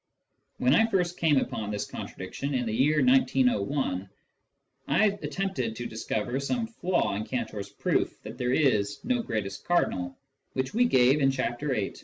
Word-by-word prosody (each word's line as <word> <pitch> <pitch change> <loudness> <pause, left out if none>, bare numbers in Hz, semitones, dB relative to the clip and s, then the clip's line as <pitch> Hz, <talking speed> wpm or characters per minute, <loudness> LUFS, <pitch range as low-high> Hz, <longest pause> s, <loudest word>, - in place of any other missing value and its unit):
When 125 +1 +3
I 225 +8 +5
first 180 -5 0
came 155 -4 +4
upon 110 -5 -1
this 105 -1 -2
contradiction, 140 0 -5
in 125 -1 0
the 110 - -2
year 145 - +3
1901, 245 - +2 0.8
I 150 +10 +4 0.2
attempted 190 -13 -2
to 120 - -5
discover 115 +2 -2
some 230 - -1
flaw 185 - -1
in 105 +2 -2
Cantor's 110 -4 -4
proof - - -1
that 110 +3 -9
there 125 0 0
is 105 -9 +2
no 245 0 +1
greatest 110 - -4
cardinal, 90 - 0 0.4
which 130 0 -2
we 245 +3 +4
gave 130 - +4
in 135 - +5
Chapter 130 +1 -2
VIII. 100 -2 -2
130 Hz, 160 wpm, -28 LUFS, 110-180 Hz, 0.8 s, I